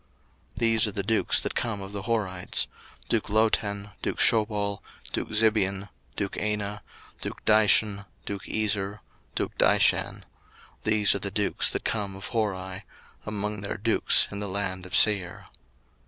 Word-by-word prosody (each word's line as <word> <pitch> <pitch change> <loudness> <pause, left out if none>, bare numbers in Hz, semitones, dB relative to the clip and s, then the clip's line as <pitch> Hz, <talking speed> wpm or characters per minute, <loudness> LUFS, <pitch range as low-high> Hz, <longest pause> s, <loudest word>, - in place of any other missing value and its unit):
01:036:029 - - -35
These 115 -1 +3
are - - -1
the 100 - -1
dukes 110 +3 +2
that - - -3
came 115 -4 -2
of 95 0 -7
the 100 -1 -4
Horites; 100 -5 0 0.4
duke 110 -2 -1
Lotan, 105 -1 +1
duke - - -2
Shobal, 105 -2 +2 0.3
duke - - -2
Zibeon, 105 -3 +2 0.3
duke 100 -1 -3
Anah, 105 -1 -2 0.4
01:036:030 - - -8
Duke - - -7
Dishon, 105 -1 +4 0.2
duke 100 -1 -6
Ezer, 105 -1 -1 0.3
duke - - -2
Dishan: - - +3 0.6
these 105 -1 +5
are 100 - -1
the 100 - -2
dukes 100 +1 +1
that - - -3
came 100 -3 -1
of 95 - -7
Hori, 95 -4 -2 0.4
among 105 -1 -2
their 100 - -4
dukes 115 +2 +3
in 100 - -4
the 100 -1 -3
land 95 -1 -3
of 90 - -3
Seir. 100 -5 +3
105 Hz, 155 wpm, -27 LUFS, 100-110 Hz, 0.6 s, these